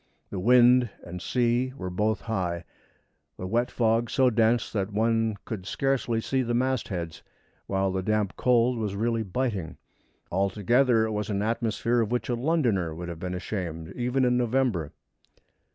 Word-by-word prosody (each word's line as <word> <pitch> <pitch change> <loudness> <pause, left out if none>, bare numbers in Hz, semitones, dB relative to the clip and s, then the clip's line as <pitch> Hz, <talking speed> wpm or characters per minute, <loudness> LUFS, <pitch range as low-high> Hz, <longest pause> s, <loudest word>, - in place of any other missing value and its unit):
The 95 - -3
wind 125 +3 +5
and 90 0 -7
sea 125 +3 +1
were 90 -1 -5
both 105 +3 0
high 90 -6 -2 0.7
the 90 - -5
wet 120 +6 0
fog 115 0 +1
so 130 -2 +3
dense 115 +1 +2
that 100 -1 -2
one 115 +1 +1
could 100 -5 -6
scarcely 135 -4 0
see 130 +3 0
the 120 -1 -1
mastheads, 110 -10 -2 0.5
while 95 0 0
the 95 0 -1
damp 105 0 0
cold 125 -1 +2
was 105 -3 -2
really 115 +2 0
biting. 105 -5 -3 0.5
Altogether 110 +6 +2
it 110 - -3
was 105 0 -3
an 100 -1 -1
atmosphere 115 +1 0
of 110 0 -2
which 125 +1 -1
a 120 - +1
Londoner 120 - 0
would 85 +1 -6
have 85 -2 -6
been 90 0 -4
ashamed 85 -4 -4
even 125 +2 0
in 125 0 +3
November. 120 - 0
110 Hz, 160 wpm, -27 LUFS, 95-120 Hz, 0.7 s, wind